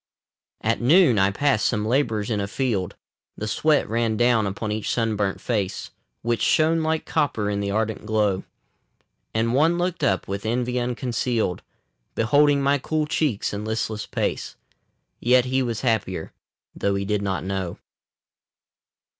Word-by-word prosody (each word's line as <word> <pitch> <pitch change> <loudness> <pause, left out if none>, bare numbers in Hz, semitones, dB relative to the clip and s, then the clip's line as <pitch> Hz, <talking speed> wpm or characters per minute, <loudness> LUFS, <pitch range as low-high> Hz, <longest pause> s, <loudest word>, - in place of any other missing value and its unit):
At 115 +2 0
noon 130 - +5
I 95 0 +4
passed 110 +2 +1
some 105 -2 0
labourers 115 -3 0
in 105 - 0
a 100 - -2
field. 100 -5 -1 0.4
The 110 - -4
sweat 150 +8 +2
ran 115 0 0
down 120 -3 +3
upon 105 +2 -3
each 105 0 -2
sunburnt 105 -4 0
face, 105 -6 -2 0.3
Which 120 0 0
shone 160 +1 +3
like 160 0 -1
copper 105 -8 0
in 100 - -1
the 100 0 -2
ardent 110 +1 -2
glow. 105 -3 +1 0.9
And 115 +1 0
one 160 +6 +3
looked 175 0 -2
up, 95 -1 +1
with 100 +1 -4
envy 125 +2 -1
unconcealed, 120 -5 -1 0.5
Beholding 140 +4 +3
my 140 +1 +3
cool 155 +3 -1
cheeks 150 -10 -1
and 100 +1 -4
listless 110 0 -3
pace, - - -2 0.6
Yet 125 +1 +4
he 130 +1 +1
was 120 -4 -2
happier, 105 -9 -1 0.4
though 100 0 0
he 100 0 -2
did 105 0 0
not 95 -2 -2
know. 95 -2 -3
115 Hz, 150 wpm, -24 LUFS, 105-130 Hz, 0.9 s, noon